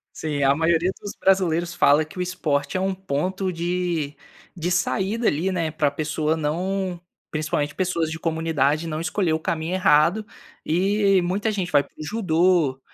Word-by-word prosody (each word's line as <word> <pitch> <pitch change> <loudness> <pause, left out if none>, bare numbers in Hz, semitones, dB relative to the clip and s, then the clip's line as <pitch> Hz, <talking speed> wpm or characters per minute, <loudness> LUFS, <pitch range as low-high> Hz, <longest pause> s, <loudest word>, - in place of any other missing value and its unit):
Sim, 150 -2 -2
a 135 0 +5
maioria 165 +3 +2
dos 205 - -7
brasileiros 175 -3 +2
fala 155 -3 +4
que 155 - -11
o - - 0
esporte 155 -4 -1
é - - 0
um 190 +1 0
ponto 185 +2 -2
de 170 -3 -2 0.4
de 175 0 -2
saída 190 +5 0
ali, 170 +6 +1
né, 165 -4 -1
pra 150 -1 +1
pessoa 155 +2 -1
não 180 +4 -2 0.3
principalmente 155 -1 -1
pessoas 170 -4 -1
de 160 - -5
comunidade 160 -2 0
não 155 0 -3
escolher 170 0 0
o 160 - 0
caminho 160 +2 -2
errado, 185 +2 +3 0.4
e 195 +3 +2
muita 200 +5 0
gente 190 -4 -3
vai 145 -3 +5
para 140 - -24
o - - -5
judô, 170 -7 +2
170 Hz, 165 wpm, -23 LUFS, 155-185 Hz, 0.4 s, a